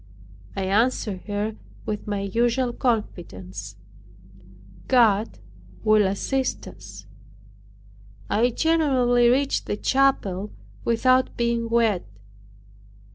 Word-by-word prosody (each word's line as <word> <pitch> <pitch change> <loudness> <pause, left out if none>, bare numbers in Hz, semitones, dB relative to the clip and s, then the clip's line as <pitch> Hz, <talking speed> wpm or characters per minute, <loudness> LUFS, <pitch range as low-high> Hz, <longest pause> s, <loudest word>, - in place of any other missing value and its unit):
I 195 - -2
answered 205 -1 0
her 210 +1 -2 0.3
with 210 0 -4
my 205 -1 -2
usual 240 +5 0
confidence, 105 - -3 1.1
"God 225 -4 +3 0.5
will 215 -2 +4
assist 260 +7 -2
us." 100 0 -11 1.2
I 235 +4 +2
generally 255 -5 +3
reached 275 +3 +1
the 205 - -2
chapel 210 -9 +1 0.3
without 255 +2 +2
being 235 -1 0
wet. 225 - +1
225 Hz, 85 wpm, -24 LUFS, 195-245 Hz, 1.2 s, will